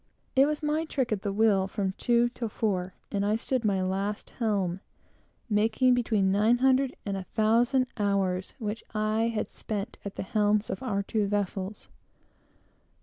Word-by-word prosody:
It 270 Hz, +2 st, +6 dB
was 300 Hz, 0 st, -2 dB
my 300 Hz, +2 st, +1 dB
trick 265 Hz, -6 st, -1 dB
at 210 Hz, -3 st, 0 dB
the 200 Hz, -, -2 dB
wheel 200 Hz, -2 st, +3 dB
from 195 Hz, -1 st, -2 dB
two 240 Hz, -1 st, +3 dB
till 240 Hz, -2 st, -5 dB
four; 190 Hz, -4 st, -2 dB, 0.2 s
and 200 Hz, -1 st, 0 dB
I 210 Hz, +1 st, +2 dB
stood 250 Hz, +2 st, -1 dB
my 195 Hz, -3 st, +1 dB
last 195 Hz, +3 st, -2 dB
helm, 195 Hz, -6 st, 0 dB, 0.7 s
making 225 Hz, +4 st, +3 dB
between 220 Hz, -6 st, +2 dB
nine 215 Hz, +5 st, +4 dB
hundred 265 Hz, +1 st, +3 dB
and 200 Hz, -1 st, -2 dB
a 190 Hz, -2 st, -5 dB
thousand 235 Hz, +4 st, +3 dB
hours 195 Hz, -3 st, 0 dB
which 220 Hz, -2 st, -4 dB
I 215 Hz, +1 st, +1 dB
had 225 Hz, -2 st, -2 dB
spent 210 Hz, +1 st, -5 dB
at 200 Hz, -, -6 dB
the -, -, -3 dB
helms 210 Hz, 0 st, +1 dB
of 190 Hz, -, -4 dB
our 200 Hz, -6 st, -1 dB
two 210 Hz, 0 st, 0 dB
vessels. 200 Hz, 0 st, -3 dB
215 Hz, 165 wpm, -28 LUFS, 200-235 Hz, 0.7 s, It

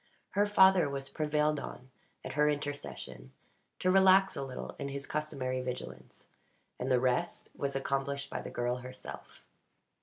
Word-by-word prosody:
Her 205 Hz, +1 st, +3 dB
father 190 Hz, -5 st, +6 dB
was 135 Hz, -1 st, -3 dB
prevailed 150 Hz, -1 st, +1 dB
on 130 Hz, -1 st, -8 dB, 0.3 s
at -, -, -5 dB
her 150 Hz, +1 st, +4 dB
intercession 145 Hz, -, -5 dB, 0.4 s
to 185 Hz, -, +2 dB
relax 190 Hz, 0 st, +6 dB
a -, -, -3 dB
little 130 Hz, -2 st, -6 dB
in 140 Hz, -, -3 dB
his 140 Hz, 0 st, -5 dB
customary 130 Hz, -4 st, -2 dB
vigilance; 125 Hz, 0 st, -7 dB, 0.5 s
and 125 Hz, -, -2 dB
the 125 Hz, -, +5 dB
rest 130 Hz, +7 st, 0 dB
was 140 Hz, -1 st, -2 dB
accomplished 140 Hz, +1 st, -1 dB
by -, -, -3 dB
the -, -, -6 dB
girl 120 Hz, +1 st, -1 dB
herself. 125 Hz, +1 st, -10 dB
140 Hz, 150 wpm, -32 LUFS, 130-155 Hz, 0.5 s, father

